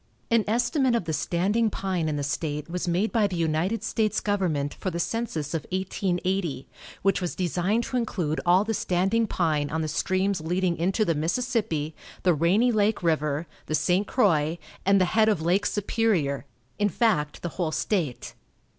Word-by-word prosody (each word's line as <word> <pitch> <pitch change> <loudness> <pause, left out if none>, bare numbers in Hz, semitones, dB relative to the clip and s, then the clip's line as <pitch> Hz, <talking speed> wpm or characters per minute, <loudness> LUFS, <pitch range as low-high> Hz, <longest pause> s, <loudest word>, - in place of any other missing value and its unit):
An 230 -2 +4
estimate 245 +3 +2
of 230 - -1
the 160 - -2
standing 200 +9 +1
pine 185 -5 -2
in 150 - -1
the 145 - -2
state 150 +1 -2
was 180 +1 -3
made 180 +6 +1
by 220 -3 +3
the 190 - -5
United 170 +6 0
States 215 -2 0
government 170 -9 -1
for 185 - -4
the 170 -1 -4
census 170 -9 -2
of 165 - -1
1880, 185 -5 -1 0.4
which 195 0 +2
was 180 - -3
designed 185 +5 0
to 255 - -2
include 180 -10 -1
all 180 +3 +4
the 225 +1 -2
standing 195 +4 +1
pine 155 -6 0
on 160 +1 -1
the - - -2
streams 185 +3 0
leading 175 +2 0
into 190 +6 +1
the 165 - +2
Mississippi, 165 - -1 0.3
the 180 - +4
Rainy 185 - +3
Lake 215 -2 +1
river, 150 -1 0 0.2
the 155 - 0
St. 180 +7 +1
Croix, 165 - +2 0.3
and 195 0 +5
the 185 - +4
head 220 +4 +3
of 205 -6 +1
Lake 180 +5 +1
Superior; 195 -10 0 0.3
in 205 0 +3
fact, 155 -11 0
the 175 - -2
whole 165 -1 -2
state. 160 - -2
180 Hz, 175 wpm, -26 LUFS, 160-210 Hz, 0.4 s, and